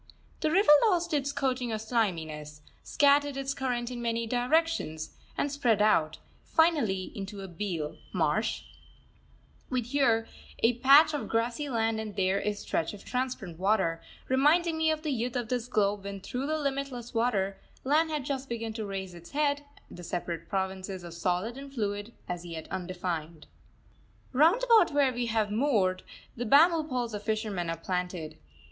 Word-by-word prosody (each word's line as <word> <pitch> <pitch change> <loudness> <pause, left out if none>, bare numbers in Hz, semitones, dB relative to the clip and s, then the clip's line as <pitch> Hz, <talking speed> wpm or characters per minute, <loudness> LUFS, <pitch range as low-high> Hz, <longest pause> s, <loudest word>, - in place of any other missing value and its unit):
The 310 - +1
river 370 +1 +5 0.2
lost 345 -3 0
its 280 -1 +1
coating 255 -3 -1
of 220 - -2
sliminess, 160 -10 -2 0.2
scattered 285 -1 +3
its 275 0 -2
current 245 -2 -2
in 240 -1 -5
many 230 0 -1
directions, 245 - 0 0.2
and 285 - 0
spread 245 -7 +2
out, 160 -7 +3 0.3
finally, 285 - +2
into 200 0 -6
a 195 - -6
beel 170 -4 -4
(marsh), - - 0 1.1
with 255 -3 -1
here 235 -4 +2 0.4
a 235 +1 +3
patch 280 +5 +7
of 295 - -3
grassy 235 +5 -1
land 225 -2 0
and 215 -2 -6
there 190 0 +1
a 210 - -1
stretch 205 -2 -2
of 200 - -14
transparent 250 -10 -3
water, 190 -4 +1 0.3
reminding 315 +6 +3
me 320 0 +2
of 315 0 -1
the 305 - -1
youth 245 -1 -2
of 240 -3 -2
this 245 -1 -1
globe 205 -4 +1
when 200 0 -6
through 250 +7 -4
the 310 +1 0
limitless 275 -4 -3
waters 220 -5 +1 0.3
land 310 +4 +3
had 300 -4 -2
just 270 -1 -3
begun 230 -1 -3
to 220 -1 -4
raise 190 -2 -5
its 170 0 -12
head, 290 0 0 0.3
the 175 - -9
separate 170 -1 -4
provinces 190 -1 -3
of 170 -1 -8
solid 180 +8 -1
and 275 0 -10
fluid 205 -1 -2 0.2
as 175 -1 -4
yet 165 -2 -7
undefined. 175 -4 -4 0.9
Round 330 - +4
about 455 -7 +6
where 275 -3 +3
we 240 0 -2
have 220 -2 0
moored, 210 -7 +2 0.3
the 245 - -3
bamboo 320 +5 +5
poles 245 -3 -2
of 205 - -4
fishermen 210 -5 -2
are 165 - -2
planted. 180 -3 -4
230 Hz, 165 wpm, -29 LUFS, 190-275 Hz, 1.1 s, patch